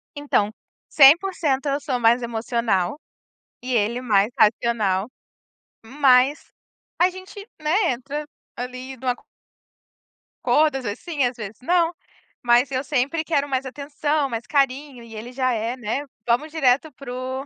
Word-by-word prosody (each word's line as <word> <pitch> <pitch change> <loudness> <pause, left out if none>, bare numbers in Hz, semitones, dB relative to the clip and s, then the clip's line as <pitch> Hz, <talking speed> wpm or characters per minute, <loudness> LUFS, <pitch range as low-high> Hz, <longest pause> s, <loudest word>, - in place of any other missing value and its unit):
Então, 280 -8 0 0.4
100% 295 -1 +4
eu 280 +1 0
sou 275 -4 -2
mais 235 +2 +4
emocional, 230 - -1 0.6
e 255 +1 -4
ele 230 +3 +1
mais 210 -4 +2
racional, 210 -3 +2 0.8
mas 265 +1 +3 0.5
a 355 - +5
gente, 375 +3 -11
né, 340 +4 +2
entra 280 +5 -5 0.3
ali 255 +1 -6
num 255 - -7
acor 250 0 -2 1.2
acordo, 300 -2 +3
às 265 - -7
vezes 205 - -4
sim, 305 -7 0
às 245 0 -1
vezes 215 -2 -8
não, 340 +4 +2 0.5
mas 245 +2 +3
eu 260 0 0
sempre 285 +3 -1
quero 285 -3 0
mais 265 0 -1
atenção, 290 +1 -2
mais 235 0 -5
carinho. 275 -2 0
E 230 -1 -13
ele 235 +4 -8
já 255 0 +1
é, 230 +2 -2
né: 255 +4 -3 0.2
"Vamos 255 +7 +1
direto 285 -1 +2
para 255 -2 -8
o 260 +2 -4
260 Hz, 145 wpm, -23 LUFS, 240-290 Hz, 1.2 s, a